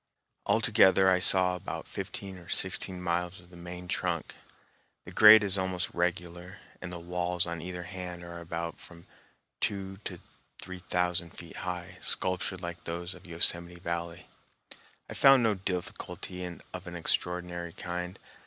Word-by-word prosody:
Altogether, 95 Hz, 0 st, +5 dB
I 90 Hz, -, +3 dB
saw 90 Hz, -1 st, +8 dB
about 90 Hz, -, -7 dB
fifteen 95 Hz, -2 st, -6 dB
or 85 Hz, -, -15 dB
sixteen 95 Hz, -1 st, +1 dB
miles 90 Hz, +1 st, -2 dB
of 90 Hz, 0 st, -18 dB
the -, -, -14 dB
main 90 Hz, +1 st, -9 dB
trunk. 85 Hz, -2 st, -2 dB, 0.7 s
The -, -, -10 dB
grade 110 Hz, 0 st, +9 dB
is 100 Hz, -1 st, +3 dB
almost 95 Hz, -1 st, -2 dB
regular, 90 Hz, +1 st, -3 dB, 0.2 s
and 90 Hz, -, -6 dB
the 90 Hz, -, -6 dB
walls 90 Hz, 0 st, -1 dB
on 85 Hz, -1 st, -5 dB
either 90 Hz, +1 st, -6 dB
hand 90 Hz, -1 st, -7 dB
are 85 Hz, 0 st, -8 dB
about 85 Hz, 0 st, -5 dB
from 85 Hz, 0 st, -14 dB, 0.5 s
two 95 Hz, -1 st, -2 dB
to 90 Hz, -3 st, -5 dB, 0.4 s
three 95 Hz, 0 st, -8 dB
thousand 90 Hz, -1 st, 0 dB
feet 85 Hz, -1 st, -10 dB
high, 90 Hz, 0 st, -6 dB
sculptured 95 Hz, 0 st, +2 dB
like 85 Hz, 0 st, -7 dB
those 85 Hz, +2 st, -4 dB
of 90 Hz, +1 st, -15 dB
Yosemite 85 Hz, +1 st, -1 dB
Valley. 85 Hz, 0 st, -5 dB, 0.8 s
I -, -, -8 dB
found 135 Hz, -2 st, +6 dB
no 110 Hz, -2 st, +3 dB
difficulty 90 Hz, -1 st, -5 dB, 0.3 s
of 95 Hz, -1 st, -8 dB
an 90 Hz, -, -7 dB
extraordinary 85 Hz, 0 st, 0 dB
kind. 90 Hz, +2 st, -5 dB
90 Hz, 150 wpm, -29 LUFS, 85-95 Hz, 0.8 s, grade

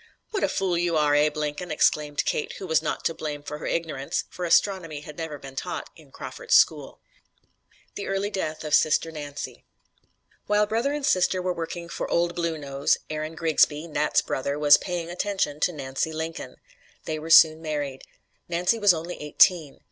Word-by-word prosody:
"What 400 Hz, -, -1 dB
a -, -, +2 dB
fool 180 Hz, -3 st, 0 dB
you 170 Hz, -2 st, +1 dB
are, 150 Hz, -1 st, +3 dB
Abe 150 Hz, +1 st, +3 dB
Lincoln!" 150 Hz, +4 st, -3 dB
exclaimed 150 Hz, -1 st, +1 dB
Kate, -, -, -1 dB
who 195 Hz, -, -7 dB
was 160 Hz, -3 st, +2 dB
not 155 Hz, -, -3 dB
to 165 Hz, -, +1 dB
blame 150 Hz, -2 st, -5 dB
for 150 Hz, 0 st, -6 dB
her -, -, -5 dB
ignorance, 155 Hz, -5 st, -2 dB
for 180 Hz, -, -5 dB
astronomy 170 Hz, -4 st, +1 dB
had 150 Hz, 0 st, -10 dB
never 160 Hz, -2 st, -5 dB
been 135 Hz, -1 st, -11 dB
taught -, -, -5 dB
in -, -, -18 dB
Crawford's -, -, -2 dB
school. -, -, +3 dB, 0.9 s
THE 200 Hz, -, -6 dB
EARLY 195 Hz, +1 st, -1 dB
DEATH 160 Hz, -6 st, -3 dB
OF 150 Hz, -1 st, -4 dB
SISTER 155 Hz, +1 st, +3 dB
NANCY 145 Hz, -2 st, -7 dB, 0.8 s
While 210 Hz, 0 st, +3 dB
brother 230 Hz, +6 st, 0 dB
and 290 Hz, -1 st, -2 dB
sister 185 Hz, -2 st, +2 dB
were 180 Hz, 0 st, -1 dB
working 170 Hz, 0 st, -5 dB
for -, -, -5 dB
"Old 170 Hz, 0 st, +1 dB
Blue 170 Hz, -2 st, -2 dB
Nose," 140 Hz, -1 st, 0 dB
Aaron 155 Hz, +1 st, -4 dB
Grigsby, 160 Hz, -1 st, +2 dB
"Nat's" 150 Hz, 0 st, +1 dB
brother, 140 Hz, +2 st, -2 dB
was 145 Hz, -1 st, +7 dB
"paying 175 Hz, -2 st, -4 dB
attention" 180 Hz, -5 st, -1 dB
to 180 Hz, -, +2 dB
Nancy 135 Hz, 0 st, -3 dB
Lincoln. 160 Hz, +1 st, -5 dB, 0.5 s
They 155 Hz, -1 st, -3 dB
were 160 Hz, +2 st, -7 dB
soon 160 Hz, -1 st, +7 dB
married. 145 Hz, -4 st, -3 dB, 0.5 s
Nancy 180 Hz, +6 st, +1 dB
was 205 Hz, -4 st, +5 dB
only 170 Hz, +2 st, -6 dB
eighteen. 150 Hz, 0 st, +3 dB
160 Hz, 180 wpm, -25 LUFS, 150-180 Hz, 0.9 s, was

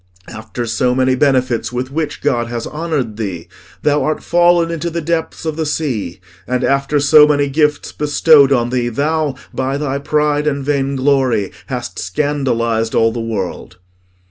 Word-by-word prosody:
After 110 Hz, +1 st, -6 dB
so 125 Hz, +2 st, 0 dB
many 130 Hz, 0 st, +2 dB
benefits 130 Hz, -4 st, +1 dB
with 125 Hz, +1 st, -4 dB
which 150 Hz, 0 st, -3 dB
God 120 Hz, -5 st, 0 dB
has 120 Hz, -1 st, -4 dB
honoured 150 Hz, -9 st, -3 dB
thee, 90 Hz, -6 st, -5 dB, 0.4 s
thou 150 Hz, 0 st, +2 dB
art 155 Hz, -, -2 dB
fallen 175 Hz, -1 st, +3 dB
into 170 Hz, +1 st, -3 dB
the 170 Hz, 0 st, -3 dB
depths 165 Hz, 0 st, -3 dB
of 160 Hz, -1 st, -3 dB
the 160 Hz, -, -1 dB
sea; 125 Hz, -, -3 dB, 0.3 s
and 125 Hz, 0 st, -1 dB
after 140 Hz, +2 st, +1 dB
so 150 Hz, +1 st, +6 dB
many 145 Hz, -1 st, +2 dB
gifts 150 Hz, +1 st, 0 dB
bestowed 145 Hz, -1 st, +4 dB
on 120 Hz, -2 st, +1 dB
thee, 120 Hz, -1 st, 0 dB
thou, 150 Hz, +3 st, -1 dB, 0.2 s
by 135 Hz, +1 st, -1 dB
thy 140 Hz, -1 st, -2 dB
pride 150 Hz, +1 st, 0 dB
and 140 Hz, -2 st, -1 dB
vainglory, 135 Hz, -6 st, +1 dB, 0.2 s
hast -, -, -5 dB
scandalised 115 Hz, -1 st, -1 dB
all 115 Hz, 0 st, +3 dB
the 120 Hz, -, -5 dB
world." 100 Hz, -5 st, -5 dB
140 Hz, 160 wpm, -17 LUFS, 120-150 Hz, 0.4 s, so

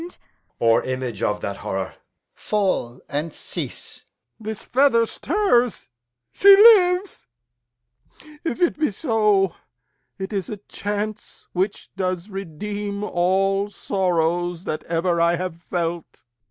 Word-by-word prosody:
Edg. 345 Hz, +2 st, -9 dB, 0.4 s
Or 115 Hz, -1 st, +3 dB
image 130 Hz, -5 st, -4 dB
of 105 Hz, -2 st, 0 dB
that 100 Hz, -1 st, -4 dB
horror? 95 Hz, -1 st, -3 dB
Alb. -, -, -19 dB, 0.4 s
Fall 190 Hz, -, -1 dB
and 150 Hz, +4 st, -3 dB
cease! -, -, -7 dB, 0.4 s
Lear. 220 Hz, -, -14 dB
This 220 Hz, -, -4 dB
feather 255 Hz, -3 st, +3 dB
stirs; 250 Hz, -, 0 dB, 0.4 s
she 395 Hz, 0 st, +8 dB
lives! 390 Hz, -, +5 dB, 1.2 s
If 325 Hz, -8 st, -3 dB
it 340 Hz, -, +1 dB
be 305 Hz, -, +2 dB
so, 210 Hz, -, +2 dB, 0.6 s
It 190 Hz, +2 st, -5 dB
is 195 Hz, -4 st, -2 dB
a 210 Hz, -, -5 dB
chance 210 Hz, +2 st, -5 dB
which 190 Hz, +3 st, -2 dB
does 185 Hz, 0 st, -3 dB
redeem 200 Hz, +3 st, -5 dB
all 195 Hz, +2 st, +1 dB
sorrows 175 Hz, -3 st, -1 dB
That 155 Hz, -, -4 dB
ever 170 Hz, +1 st, 0 dB
I 170 Hz, +1 st, +3 dB
have 175 Hz, -1 st, -5 dB
felt. 170 Hz, -2 st, -4 dB
195 Hz, 125 wpm, -22 LUFS, 170-215 Hz, 1.2 s, she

